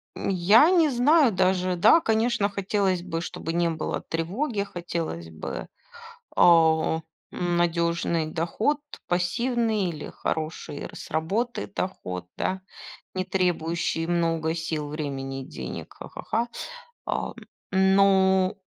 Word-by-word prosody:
М, - - -3
я 200 - +6
не 335 -5 +4
знаю 270 +1 +4
даже. 185 -1 +1
Да, 220 - +6
конечно, 225 -3 +1
хотелось 195 -2 0
бы, 165 -2 -3
чтобы 165 -1 -5
не 170 0 +2
было 160 -1 -3
тревоги. 200 - -2
Хотелось 165 - -5
бы, 80 -1 -6 0.7
а, 160 -1 +5 0.3
надёжный 170 -1 0
доход, 175 - 0 0.3
пассивный 220 +4 +1
или 155 -3 -6
хороший 155 -2 -4
р - - -8
с - - -9
работы 200 +11 -1
доход, 90 - -4
да. 190 0 -1 0.5
Не 185 - -1
требующий 170 -3 0
много 165 -2 +1
сил, 160 -2 -3
времени 135 -3 -4
и - - -11
денег. 65 - -7
Ха-ха-ха. 230 +2 -3 0.6
А, - - -2 0.4
но, 190 -1 +4
175 Hz, 115 wpm, -26 LUFS, 165-200 Hz, 0.7 s, я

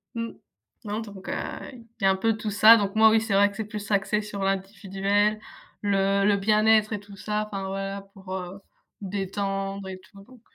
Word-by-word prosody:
Mmh. 230 0 -4 0.5
Non, 210 +2 -3
donc 200 -3 -9
heu, - - -1 0.4
il 230 -2 -14
y - - +2
a 195 - +6
un 190 - +1
peu 220 +3 0
tout 215 -1 -4
ça. 220 +3 +8
Donc 200 0 -2
moi, 220 0 +7
oui, 220 0 +4
c'est 225 -2 -2
vrai 200 +1 +5
que 200 - -13
c'est 220 - -4
plus 210 0 -7
axé 200 +2 +1
sur 205 -2 -5
l'individuel, 195 +2 0 0.4
le 195 -1 +2
le 205 -1 +4
bien-être 215 +1 +3
et 205 - -2
tout 205 -1 -14
ça, 210 +2 -2
enfin 195 -2 -5
voilà 195 +1 -4
pour, 190 -2 -11
heu, 185 +1 -6 0.4
détendre 195 0 -3
et 185 0 -7
tout, 195 +1 -17
donc. 250 0 -18
200 Hz, 205 wpm, -26 LUFS, 195-215 Hz, 0.5 s, ça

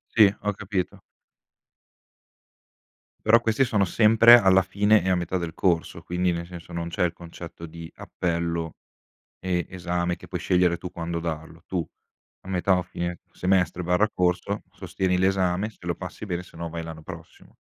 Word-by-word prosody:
Sì, 105 -3 +7
ho 105 0 -1
capito. 95 -2 -3 2.3
Però, 115 +2 +7
questi 115 +3 +2
sono 105 -6 +2
sempre, 115 +4 +7
alla 95 -3 +5
fine, 100 +3 +3
e 95 - -1
a 95 - +4
metà 90 +1 -1
del 85 -2 -4
corso, 85 -1 0
quindi, 90 +1 0
nel 85 0 -4
senso, 85 0 -11
non 85 0 -3
c'è 85 - -1
il 85 - -1
concetto 85 0 -10
di 85 0 -9
appello, 85 -2 -2 0.7
e, 90 -2 -1
esame, 90 -1 -2
che - - -14
puoi - - -3
scegliere 90 -1 +2
tu 90 +1 -7
quando 85 0 -3
darlo. 80 0 -6
Tu, 90 -4 -2 0.6
a - - -13
metà 95 0 +2
o 90 - -1
fine 85 0 -4
semestre/corso, 90 +2 +1
sostieni 90 -1 -1
l'esame; 95 +2 +1
se - - -25
lo 85 - -1
passi, 90 +3 -7
bene, 90 -2 -3
sennò, 85 -1 -7
vai 85 0 -5
l'anno 80 -1 -8
prossimo. - - -12
90 Hz, 160 wpm, -25 LUFS, 85-95 Hz, 2.3 s, Sì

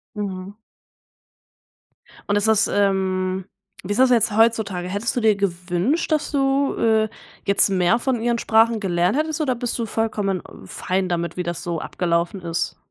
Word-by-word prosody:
Mhm. 195 -2 -5 1.8
Und 205 - +2
ist 205 +1 +1
das, 220 -1 +3
ähm 190 -2 0 0.4
wie 205 +3 -2
ist 235 - -3
das 260 -1 +5
jetzt 230 -2 +3
heutzutage? 215 -6 +2
Hättest 205 +5 -2
du 245 - 0
dir 220 -2 +4
gewünscht, 190 - -1
dass 305 - +1
du, 275 0 +1
äh, 220 -1 +2 0.4
jetzt 200 +1 +4
mehr 185 +4 +3
von 245 -1 -1
ihren 235 0 +1
Sprachen 225 0 +3
gelernt 180 +3 +1
hättest 315 0 -1
oder 260 -5 0
bist 240 0 -3
du 230 - -2
vollkommen, 210 -4 -1
äh, - - -16 0.2
fein 185 0 -2
damit, 170 -1 -2
wie 180 - -2
das 170 -1 -4
so 170 -2 -3
abgelaufen 170 +2 -1
ist? 165 0 -2
205 Hz, 165 wpm, -22 LUFS, 185-230 Hz, 1.8 s, das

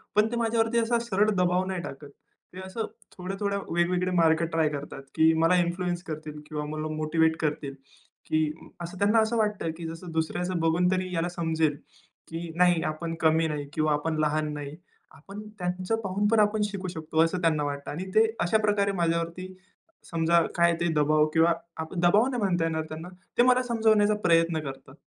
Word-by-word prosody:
पण 210 +1 +4
ते - - -2
माझ्या 230 -1 0
वरती 225 +1 +2
असा 235 +1 +1
सरळ 205 +2 +3
दबाव 180 -2 +1
नाही 185 -2 -3
टाकत. 140 +1 -8 0.4
ते 185 - -9
असं 220 +4 -4 0.3
थोड्या-थोड्या 195 +2 -2
वेगवेगळे 180 +2 +1
मार्ग 160 0 +3
ट्राय 160 -2 +2
करतात, 140 -2 -7
की 160 0 +5
मला 175 +2 +4
इन्फ्लुअन्स 175 0 -2
करतील 155 -2 -7
किंवा 150 -1 -3
मला 155 0 -3
मोटिव्हेट 160 +1 +1
करतील. 150 -2 -2 0.5
की 155 0 +1 0.4
असं 175 +2 -6
त्यांना 210 +3 +4
असं 220 +1 +1
वाटतं, 210 -6 0
की 165 -1 -6
जसं 165 +2 -8
दुसऱ्याचं 170 +2 -1
बघून 165 +3 +2
तरी 185 -1 -1
याला 165 +1 0
समजेल. 160 -4 0 0.5
की 165 +1 -6
नाही 175 -2 +4
आपण 165 +1 -5
कमी 160 0 +3
नाही, 150 -2 -4
किंवा 155 -1 +1
आपण 155 +2 -1
लहान 155 0 0
नाही. 145 0 -6 0.4
आपण 200 +7 -10 0.2
त्यांचं 180 +4 -1
पाहून 200 +2 0
पण 225 0 +3
आपण 210 0 +3
शिकू 200 -2 -5
शकतो 160 -2 -4
असं 170 +2 -1
त्यांना 160 -3 +2
वाटतं. 140 -1 -4
आणि 175 +6 -5
ते 220 - +6 0.2
अशा 175 +5 +3
प्रकारे 205 -1 +2
माझ्या 170 -3 +1
वरती, 180 +3 -6 0.6
समजा 170 0 +3
काय 170 0 +4
ते 170 - +2
दबाव 150 0 +3
किंवा 165 +1 +4 0.4
दबाव 180 +7 +4
नाही 250 -3 -2
म्हणता 175 -4 +1
येणार 160 -1 -1
त्यांना 160 +3 -7 0.3
ते 240 - +6
मला 255 0 +4
समजावण्याचा 220 -3 +3
प्रयत्न 165 -1 +3
करतात. 135 0 -11
170 Hz, 180 wpm, -27 LUFS, 160-195 Hz, 0.6 s, ते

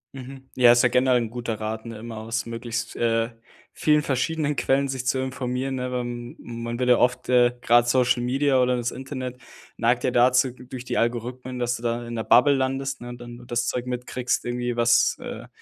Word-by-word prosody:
Mhm. 135 0 -10
Ja, 125 -2 +7
ist 120 0 +5
ja - - +5
generell 125 +1 +3
'n 115 -2 -3
guter 115 -2 -4
Rat, 110 +1 -4
ne, 115 -1 -7
immer 115 0 -8
aus 115 +1 -3
möglichst, 115 0 -5
äh, 115 0 +1 0.4
vielen 150 -1 +3
verschiedenen 150 +2 -1
Quellen 140 +1 +1
sich 130 -2 -4
zu 130 - +1
informieren, 130 0 -3
ne, 125 0 -3
wa 125 -1 -1
man 120 -1 -6
wird 125 - 0
ja 125 - +6
oft 125 0 +1
äh, 125 -1 +4
gerade 120 0 +4
Social 125 0 +2
Media 135 +1 +2
oder 125 0 +1
das 120 0 -2
Internet, 130 -2 -6 0.4
neigt 120 +1 +1
ja 130 - +2
dazu 125 +1 +4
durch 125 0 -10
die - - -2
Algorithmen, 125 +2 -2
dass 120 0 0
du 120 - -9
da 120 0 -2
in 120 - -6
'ner 115 -1 -2
Bubble 125 +6 +5
landest, 135 0 -2
ne, 120 - -7
und 120 0 -8
dann 120 0 -9
nur 120 0 -13
das 120 0 -1
Zeug 125 +1 -2
mitkriegst, 125 0 -2
irgendwie 120 0 -2
was 120 0 +3
äh, - - -7
125 Hz, 210 wpm, -24 LUFS, 120-130 Hz, 0.4 s, Ja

